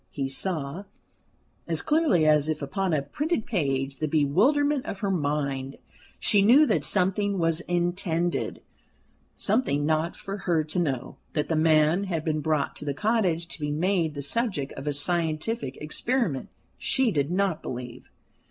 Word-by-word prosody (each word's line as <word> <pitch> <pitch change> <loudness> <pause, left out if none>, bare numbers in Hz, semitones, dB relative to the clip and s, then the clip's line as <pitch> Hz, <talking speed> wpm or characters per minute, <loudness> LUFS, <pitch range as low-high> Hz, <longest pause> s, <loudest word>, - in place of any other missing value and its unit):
He 135 -2 -3
saw, 160 +3 -3 0.8
as - - -1
clearly 300 - +3
as 150 0 +4
if 155 -2 -2
upon 185 +7 -1
a 150 -3 +1
printed 290 - -2
page, 135 - -1
the 155 - -1
bewilderment 250 - +2
of - - -4
her 200 -2 0
mind. 140 -5 -2 0.4
She 205 -3 +4
knew 250 +9 +7
that 230 - +1
something 195 +1 +1
was 165 -1 +1
intended 175 -1 -1 0.7
something 195 - +1
not 160 +2 0
for 195 +1 -6
her 170 -5 +1
to 155 +4 -2
know. 135 -8 -2 0.2
That 150 - -1
the 165 - +1
man 155 +4 +3
had 165 -5 -3
been 155 -1 0
brought 155 -2 0
to - - -6
the 140 -1 -2
cottage 190 -5 +1
to - - -4
be 150 -1 -2
made 165 0 0
the 140 - -4
subject 185 - 0
of 135 - -8
a 145 - +1
scientific 160 - -1
experiment 175 - -1 0.3
she 265 -4 +2
did 145 -4 0
not 185 -2 0
believe. 125 -1 -7
165 Hz, 160 wpm, -26 LUFS, 145-195 Hz, 0.8 s, knew